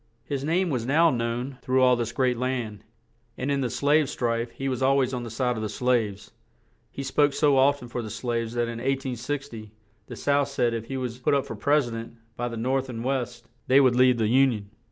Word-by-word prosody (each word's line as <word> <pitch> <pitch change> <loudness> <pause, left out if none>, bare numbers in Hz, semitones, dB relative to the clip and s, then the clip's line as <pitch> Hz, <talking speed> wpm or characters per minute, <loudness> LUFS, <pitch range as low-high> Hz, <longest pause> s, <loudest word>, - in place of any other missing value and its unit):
His 140 -1 -3
name 170 +3 +1
was 125 -4 -1
now 160 +6 +4
known 120 +2 -3
through 130 -1 +2
all 125 -1 +5
this 120 -1 -2
great 125 0 +1
land; 120 -4 -3 0.5
and 130 +3 -2
in 140 -1 +1
the 125 - -1
slave 145 +4 +2
strife 115 -2 -1
he 135 +3 -5
was 130 -2 -2
al 135 +1 +4
ways 130 -1 +1
on 125 - -2
the 120 - -6
side 125 +2 -1
of - - -3
the 110 - -3
slaves. 110 -3 -1 0.6
He 140 - -6
spoke 145 +1 +2
so 145 -2 +3
oft 140 +1 +3
en - - -8
for 120 0 -4
the 110 - -6
slaves 115 +1 -3
that 120 - +1
in 115 0 -4
1860, 130 -2 -3 0.4
the - - -8
South 140 -1 +1
said 120 -4 0
if 115 -1 -4
he 135 +3 -4
was 125 -2 -4
put 130 - +2
up 140 - 0
for - - -6
pres 140 +4 +2
i - - -8
dent, 115 0 -7 0.2
by 120 - -2
the 115 -1 -5
North 130 +3 -1
and 115 -2 -5
West, 125 -2 -3 0.2
they 130 +2 +6
would 130 -3 +4
leave 125 -1 +5
the 110 - +1
Union. 115 -4 +2
125 Hz, 235 wpm, -26 LUFS, 115-135 Hz, 0.6 s, they